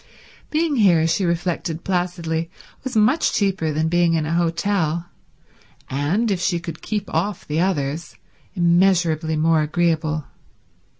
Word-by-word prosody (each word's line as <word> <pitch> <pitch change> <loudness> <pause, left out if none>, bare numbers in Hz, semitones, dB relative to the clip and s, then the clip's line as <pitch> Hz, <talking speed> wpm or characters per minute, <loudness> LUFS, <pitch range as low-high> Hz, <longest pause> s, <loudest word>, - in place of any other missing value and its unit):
Being 310 -2 0
here, 175 -7 +4
she 175 +4 +1
reflected 170 -1 -2
placidly, 175 -3 -2 0.3
was 260 -2 -5
much 215 +9 +3
cheaper 190 -6 0
than 155 +2 0
being 170 0 +2
in 155 -2 0
an 155 - -2
hotel 170 -1 0 0.9
and, 170 - 0
if 190 - 0
she 175 -1 +1
could 170 -1 -8
keep 210 -2 -3
off 205 -2 -1
the 150 +2 -1
others, 165 -3 -1 0.4
immeasurably 170 -3 +2
more 160 0 +3
agreeable. 155 -1 0
170 Hz, 130 wpm, -21 LUFS, 160-190 Hz, 0.9 s, here